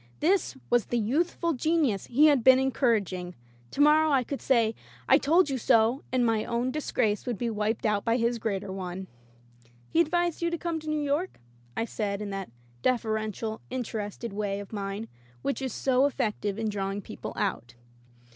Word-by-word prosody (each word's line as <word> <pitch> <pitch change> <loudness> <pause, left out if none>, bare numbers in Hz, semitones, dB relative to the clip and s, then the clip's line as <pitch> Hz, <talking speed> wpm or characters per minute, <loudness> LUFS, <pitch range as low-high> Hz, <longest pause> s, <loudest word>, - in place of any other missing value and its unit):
This 355 -3 +1
was 240 -2 +4
the 240 - 0
youthful 330 +9 0
genius 285 - +1
he 280 +6 +4
had 285 -6 +5
been 260 +1 +8
encouraging! 215 -9 0 0.3
To 285 - -2
morrow 305 +1 +6
I 270 -3 +3
could 275 +3 -5
say, 230 -4 +3 0.3
"I - - +6
told 335 +5 +4
you 265 - -1
so," 230 +4 +3
and 250 -1 +2
my 225 -2 +2
own 240 +2 -1
dis 305 +2 -4
grace 215 -1 0
would 240 -4 -1
be 235 +1 -1
wiped 215 +1 -1
out 210 -2 +1
by 230 0 +2
his 235 0 0
greater 200 -3 -3
one. 190 0 -5 0.9
"He 335 - +4
advised 345 +1 0
you 340 - +1
to 340 - -2
come 335 -1 -2
to 310 0 -7
New 305 -1 0
York 295 +6 -1 0.2
?" 120 0 -26
I 225 - +1
said 205 -3 -3
in 210 -1 -5
that 195 -1 -5 0.3
deferential, 220 - -1
interested 230 -3 -4
way 200 -1 -2
of 205 +1 -9
mine 200 +2 -4 0.4
which 275 - -1
is 260 -1 -2
so 265 +4 +2
effective 210 -6 -2
in 220 -1 -1
drawing 200 -1 -3
people - - -7
out. 120 +1 -2
235 Hz, 185 wpm, -28 LUFS, 210-280 Hz, 0.9 s, been